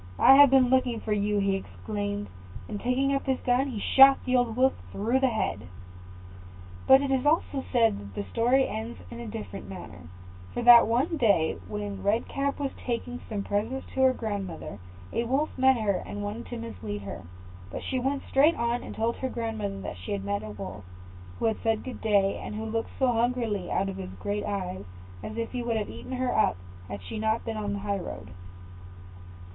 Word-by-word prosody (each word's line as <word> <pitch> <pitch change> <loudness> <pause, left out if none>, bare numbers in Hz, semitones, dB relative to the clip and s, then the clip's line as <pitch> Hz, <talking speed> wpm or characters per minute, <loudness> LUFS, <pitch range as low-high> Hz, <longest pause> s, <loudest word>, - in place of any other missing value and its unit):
I 265 - +8
have 285 0 +9
been 260 -1 +5
looking 255 -3 +2
for 215 - -2
you," 210 0 +1 0.2
exclaimed 100 - -4 0.4
he; - - -12
and 205 - -4
taking 265 +3 +1
up 275 - -2
his 265 -1 +1
gun, 250 +2 +2
he 245 -6 -4
shot 270 +5 +7
the 255 - +1
old 245 -3 +2
Wolf 260 +2 +4 0.2
through 230 +6 +1
the 265 - +3
head. 160 - -2 1.2
But 265 +1 +7
it 275 - -1
is 265 -1 +2
also 290 -2 +1
said 230 -4 +3
that 100 -1 -11
the - - -2
story 260 +3 +3
ends 115 +1 -5
in - - -7
a 120 - -6
different 100 -2 -7
manner; 85 -2 -9 0.5
for 240 - -1
that 240 -1 +9
one 260 +9 +1
day, 200 - +2
when 205 -1 -5
Red 215 +4 +1
Cap 280 0 -1
was 275 -2 -1
taking 245 0 -3
some 205 -3 -2
presents 220 +7 -2
to 265 - 0
her 260 0 +6
grandmother, 200 - -5 0.3
a 235 - 0
Wolf 270 +6 0
met 265 0 +4
her, 205 -4 0
and 205 0 -6
wanted 210 +3 -5
to 240 - -6
mislead 110 - -6
her; 100 - -6 0.5
but - - -6
she 260 - -1
went 270 +2 -1
straight 295 +5 +4
on, 235 +1 0
and - - -8
told 230 +1 0
her 260 - -2
grandmother 220 -5 -3
that 90 - -6
she 90 - -4
had 100 -1 -3
met 100 0 -1
a 110 - -7
Wolf, 100 -1 -7 0.5
who 225 -1 +1
said 225 -1 0
good 260 - -7
day, 200 -2 +2
and - - -6
who 220 +1 -4
looked 225 +1 -2
so 260 -2 +3
hungrily 230 -5 0
out 195 - 0
of 195 -1 -5
his 190 -1 -6
great 205 0 -2
eyes, 185 - -3 0.4
as 215 - -7
if 230 0 -3
he 250 - -3
would 235 -1 -1
have 210 - -3
eaten - - -8
her 255 0 -1
up 215 - +3 0.3
had 100 -1 -7
she 150 - -6
not 220 +1 0
been 225 - -3
on 205 -1 -2
the 200 - -3
high 200 -1 0
road. 95 - -7
225 Hz, 205 wpm, -27 LUFS, 195-255 Hz, 1.2 s, have